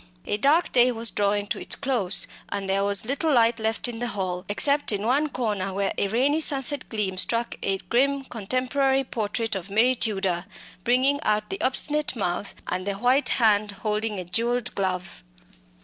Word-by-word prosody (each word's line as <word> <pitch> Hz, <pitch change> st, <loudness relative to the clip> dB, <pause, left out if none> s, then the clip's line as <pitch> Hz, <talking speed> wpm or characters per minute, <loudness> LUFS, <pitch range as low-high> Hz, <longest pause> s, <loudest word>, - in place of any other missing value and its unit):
A -, -, -1 dB
dark 295 Hz, +9 st, +2 dB
day 250 Hz, 0 st, +5 dB
was 230 Hz, -1 st, +2 dB
drawing 205 Hz, 0 st, 0 dB
to 205 Hz, -, -4 dB
its -, -, -2 dB
close, 240 Hz, -9 st, +1 dB, 0.2 s
and 195 Hz, -1 st, -4 dB
there 195 Hz, +1 st, 0 dB
was 200 Hz, +1 st, +2 dB
little 285 Hz, +6 st, 0 dB
light 230 Hz, -3 st, +3 dB
left 220 Hz, +2 st, -1 dB
in 235 Hz, -2 st, -6 dB
the 245 Hz, -, -2 dB
hall, 185 Hz, -4 st, -4 dB
except 285 Hz, +7 st, +3 dB
in 205 Hz, 0 st, -2 dB
one 285 Hz, +6 st, +1 dB
corner 205 Hz, -7 st, -3 dB
where 200 Hz, 0 st, -1 dB
a 200 Hz, -, 0 dB
rainy 265 Hz, +9 st, +1 dB
sunset 280 Hz, -2 st, +4 dB
gleam 200 Hz, -4 st, -2 dB
struck 230 Hz, +5 st, 0 dB
a 195 Hz, 0 st, 0 dB
grim 275 Hz, +7 st, 0 dB
contemporary 260 Hz, +4 st, -1 dB
portrait 225 Hz, -2 st, -3 dB
of 190 Hz, 0 st, -6 dB
Mary 225 Hz, +6 st, +3 dB
Tudor, 195 Hz, -7 st, -1 dB, 0.4 s
bringing 260 Hz, +5 st, +2 dB
out 210 Hz, -5 st, -1 dB
the 195 Hz, -, -4 dB
obstinate 295 Hz, +3 st, +1 dB
mouth 195 Hz, -2 st, -3 dB
and 185 Hz, +2 st, -4 dB
the 200 Hz, -, -1 dB
white 250 Hz, +7 st, +2 dB
hand 210 Hz, -3 st, +2 dB
holding 215 Hz, 0 st, 0 dB
a 180 Hz, -, -5 dB
jewelled 235 Hz, +6 st, -1 dB
glove. 185 Hz, -, -3 dB
225 Hz, 180 wpm, -24 LUFS, 200-255 Hz, 0.4 s, day